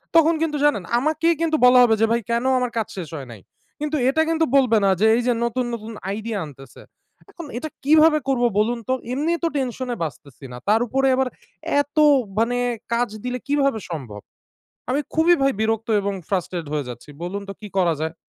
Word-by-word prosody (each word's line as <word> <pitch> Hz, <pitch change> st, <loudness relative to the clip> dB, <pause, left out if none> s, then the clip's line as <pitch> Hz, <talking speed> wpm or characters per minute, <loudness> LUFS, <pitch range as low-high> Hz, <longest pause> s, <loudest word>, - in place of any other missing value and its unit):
তখন 330 Hz, 0 st, +6 dB
কিন্তু 300 Hz, -2 st, 0 dB
জানেন 250 Hz, -10 st, +2 dB, 0.2 s
আমাকেই 315 Hz, +4 st, +1 dB
কিন্তু 325 Hz, -1 st, +1 dB
বলা 250 Hz, 0 st, +7 dB
হবে 225 Hz, -2 st, +4 dB
যে, -, -, +6 dB
"ভাই, 235 Hz, 0 st, +2 dB
কেন 235 Hz, +2 st, 0 dB
আমার 250 Hz, -1 st, -1 dB
কাজ 220 Hz, -, 0 dB
শেষ 170 Hz, -5 st, -5 dB
হয় 135 Hz, -4 st, -7 dB
নাই?" 110 Hz, -, -12 dB, 0.4 s
কিন্তু 300 Hz, +1 st, -2 dB
এটা 315 Hz, +4 st, +2 dB
কিন্তু 325 Hz, 0 st, +2 dB
বলবে 250 Hz, -5 st, +4 dB
না -, -, +4 dB
যে, -, -, +5 dB
এইযে 245 Hz, +1 st, +1 dB
নতুন, 250 Hz, +2 st, -1 dB
নতুন 225 Hz, -1 st, -6 dB, 0.2 s
আইডিয়া 215 Hz, +1 st, -3 dB
আনতেসে। 135 Hz, -2 st, -13 dB, 0.5 s
এখন 340 Hz, -5 st, -9 dB
এটা 310 Hz, +6 st, -4 dB, 0.2 s
কীভাবে 310 Hz, +1 st, +5 dB
করবো 245 Hz, -3 st, +2 dB
বলুন 235 Hz, +3 st, +1 dB
তো? -, -, +3 dB, 0.2 s
এমনি 300 Hz, +5 st, 0 dB
তো -, -, +3 dB
টেনশনে 255 Hz, -2 st, -3 dB
বাঁচতেসিনা; 135 Hz, -3 st, -8 dB
তার 215 Hz, +2 st, +4 dB
ওপরে 270 Hz, +3 st, +1 dB
আবার 265 Hz, 0 st, +1 dB, 0.5 s
এত 290 Hz, +2 st, -11 dB, 0.4 s
মানে 240 Hz, +2 st, +1 dB, 0.4 s
কাজ 240 Hz, -1 st, +1 dB
দিলে, 250 Hz, 0 st, -2 dB
কীভাবে 275 Hz, -5 st, +1 dB
সম্ভব? 120 Hz, -11 st, -6 dB, 0.7 s
আমি 275 Hz, +3 st, +1 dB
খুবই 330 Hz, +2 st, +5 dB
ভাই 275 Hz, 0 st, +3 dB
বিরক্ত 225 Hz, +1 st, 0 dB
এবং 200 Hz, 0 st, -2 dB
frustrate 180 Hz, -4 st, -2 dB
হয়ে 150 Hz, -3 st, -2 dB
যাচ্ছি। 125 Hz, +4 st, -9 dB
বলুন 200 Hz, +3 st, -4 dB
তো 195 Hz, -, -4 dB
কী 210 Hz, -, -8 dB
করা 175 Hz, -3 st, +3 dB
যায়? 160 Hz, +1 st, -3 dB
240 Hz, 190 wpm, -22 LUFS, 200-285 Hz, 0.7 s, বলা